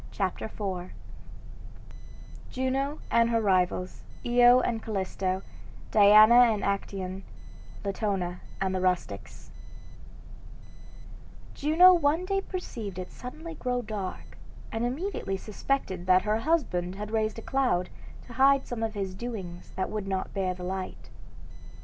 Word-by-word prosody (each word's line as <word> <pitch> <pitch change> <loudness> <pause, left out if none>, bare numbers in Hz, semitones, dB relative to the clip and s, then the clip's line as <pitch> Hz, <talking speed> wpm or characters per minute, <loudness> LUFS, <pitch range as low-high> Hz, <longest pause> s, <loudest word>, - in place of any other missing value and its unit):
CHAPTER 190 -3 -2
IV 190 -4 -5 1.6
JUNO 270 +3 -2
AND 235 0 +4
HER 230 -1 +2
RIVALS, 185 -3 0 0.2
IO 245 +1 +6
AND 230 -2 -1
CALLISTO 190 -2 -2 0.5
DIANA 215 +2 +8 0.2
AND 210 -2 -2
ACTAEON 195 -1 -3 0.6
LATONA 195 -3 -2 0.2
AND 190 -1 0
THE 185 - -1
RUSTICS 185 -1 -2 2.0
Juno 330 +5 +6
one 330 +1 +2
day 390 +1 0
perceived 230 - -6
it 185 0 -6
suddenly 315 +7 -8
grow 250 -4 -2
dark, 210 -4 -6 0.3
and 225 +1 -2
immediately 260 - -3
suspected 195 -3 -3
that 185 0 +5
her 215 +1 +1
husband 225 - 0
had 210 +1 -6
raised 220 0 0
a 225 - -7
cloud 250 -10 0 0.3
to 240 - -11
hide 270 +2 +4
some 240 -2 -5
of 225 -1 -2
his 195 -2 -3
doings 190 -5 -7
that 190 - -2
would 210 -2 -4
not 190 -1 -3
bear 185 -2 -1
the 180 - -9
light. 185 +1 -5
215 Hz, 125 wpm, -28 LUFS, 190-250 Hz, 2.0 s, DIANA